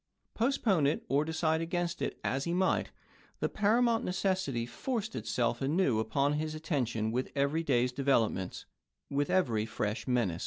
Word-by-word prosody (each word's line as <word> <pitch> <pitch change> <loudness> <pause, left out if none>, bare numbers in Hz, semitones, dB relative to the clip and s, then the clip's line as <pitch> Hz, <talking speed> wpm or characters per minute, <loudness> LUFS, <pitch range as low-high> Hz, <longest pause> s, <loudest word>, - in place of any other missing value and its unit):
Postpone 220 - +2
°pU58.ie' 145 - +4
it, - - -8
or 140 +2 +3
decide 160 0 0
against 170 +1 -2
it - - -3
as 135 +2 -1
he 170 - -1
might, 185 +1 +1 0.5
the - - +1
paramount 225 +2 +2
necessity 180 -10 0
forced 220 - -3
itself 120 0 -1
anew 135 -4 +2
upon 140 +6 +1
his 155 +1 -2
attention 125 -9 -1
with 125 +3 -2
every 140 +3 +1
day's 125 -5 +2
developments, 120 -8 0 0.5
with 140 +1 0
every 115 -12 +1
fresh 105 +2 -3
menace. 115 -10 +1
145 Hz, 155 wpm, -31 LUFS, 120-180 Hz, 0.5 s, °pU58.ie